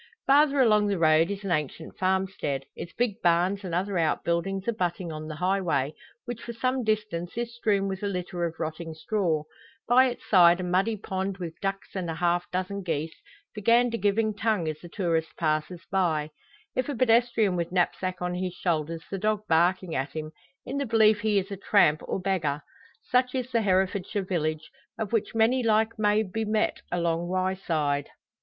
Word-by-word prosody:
Farther 285 +1 +4
along 215 -4 +4
the 200 -1 0
road 160 +1 +4
is 200 0 -4
an 195 - -3
ancient 155 0 -2
farmstead, 190 -7 -1
its 170 - -7
big 230 -2 -1
barns, 180 +4 +2
and 175 -3 -3
other 190 0 0
outbuildings, 170 +4 0
abutting 180 -6 -1
on 155 0 -6
the 155 - -6
highway, 175 -5 0 0.3
which 240 -2 -6
for 235 - -6
some 255 +2 -1
distance 210 -5 -2
is 235 0 -3
strewn 205 -4 +1
with 190 -1 -4
a 205 - -1
litter 180 -2 -3
of 165 -1 -4
rotting 160 0 -4
straw; 165 -3 0 0.4
by 255 +2 +6
its 245 - -6
side 175 -2 +6
a - - -3
muddy 190 +5 +1
pond 190 -1 -3
with 170 -4 -5
ducks 195 0 -3
and 185 -3 -3
a 165 - -3
half 175 +1 0
dozen 185 +2 -3
geese, 160 -3 -2 0.4
the 210 - -7
gander 235 +2 +4
giving 210 +2 +1
tongue 210 -5 0
as 155 -1 -3
the 175 - -11
tourist 165 -4 -1
passes 155 +2 -1
by; 160 -6 +1 0.4
if 255 +2 -1
a 285 - -2
pedestrian 230 -4 +3
with 170 0 -2
knapsack 185 0 0
on 180 0 -1
his 180 0 -3
shoulders 165 -2 -2
the 195 - -3
dog 215 +1 0
barking 175 +1 +2
at 135 0 -2
him, 155 -1 -5 0.3
in 280 +2 -3
the 280 - -1
belief 220 -1 +4
he 210 -1 +1
is 195 +1 -1
a 200 - -4
tramp 185 -6 +3
or - - -2
beggar. 165 -6 -1 0.4
Such 250 +1 +1
is 255 -1 -3
the 230 -2 +2
Herefordshire 190 0 0
village, 155 -4 -2 0.3
of 220 0 -4
which 225 0 0
many 230 +3 +3
like 220 -1 +1
may 210 0 +3
be 220 +3 -3
met 215 0 0
along 170 -1 0
Wyeside. 175 -6 -1
190 Hz, 185 wpm, -27 LUFS, 170-215 Hz, 0.4 s, by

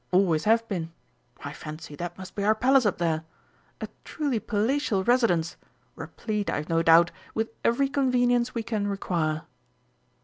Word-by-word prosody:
Always 180 -4 +2
have 230 +1 +3
been.... 170 -6 -4 0.5
I 140 - -5
fancy 155 0 -9
that 175 0 -5
must 185 0 -9
be 200 - -3
our 215 +2 +4
Palace 255 +1 +4
up 200 - 0
there. 160 -2 0 0.6
A - - -3 0.2
truly 285 -7 -2
palatial 215 -1 0
residence 190 -9 +2 0.4
replete, 210 -3 -4
I've 150 +1 -3
no 165 0 +2
doubt, 165 +1 +6 0.2
with 225 0 -1
every 275 +4 +2
convenience 250 -3 +1
we 230 - -1
can 215 -2 -2
require." 165 -6 -1
205 Hz, 150 wpm, -26 LUFS, 165-235 Hz, 0.6 s, doubt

